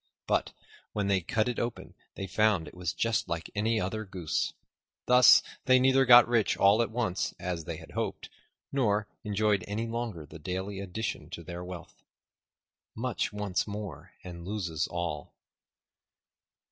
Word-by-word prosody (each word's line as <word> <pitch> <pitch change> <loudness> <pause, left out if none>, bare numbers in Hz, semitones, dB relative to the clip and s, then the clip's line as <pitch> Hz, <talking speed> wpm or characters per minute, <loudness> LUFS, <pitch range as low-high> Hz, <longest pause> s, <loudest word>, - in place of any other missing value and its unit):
But - - 0 0.4
when 105 -1 -1
they 95 -2 +3
cut 110 +6 0
it 125 - -2
open 120 -1 -4 0.2
they 95 - -4
found 100 -3 +2
it - - -11
was 90 -2 -3
just 115 +4 0
like 85 -2 -4
any 110 +2 +1
other 110 +3 -2
goose. 90 -5 -2 0.5
Thus, 125 0 +7 0.2
they 130 -1 +6
neither 130 +1 +4
got 120 -1 +9
rich 115 -3 +2
all 100 +3 +5
at 115 - 0
once, 110 -5 -1
as 85 -3 -3
they - - -5
had - - -12
hoped, - - -3 0.4
nor 105 -6 +1 0.2
enjoyed 105 -2 +1
any 105 +3 -2
longer 115 -8 -4
the 80 +3 -12
daily 95 +4 -4
addition 95 -5 -4
to 85 -1 -7
their 85 +2 -7
wealth. 90 -1 -9 0.9
Much 125 +1 -2
wants 105 -2 -2
more 100 -4 -7
and 85 -2 -8
loses 85 -6 -2
all. 85 -4 -4
100 Hz, 155 wpm, -29 LUFS, 90-110 Hz, 0.9 s, got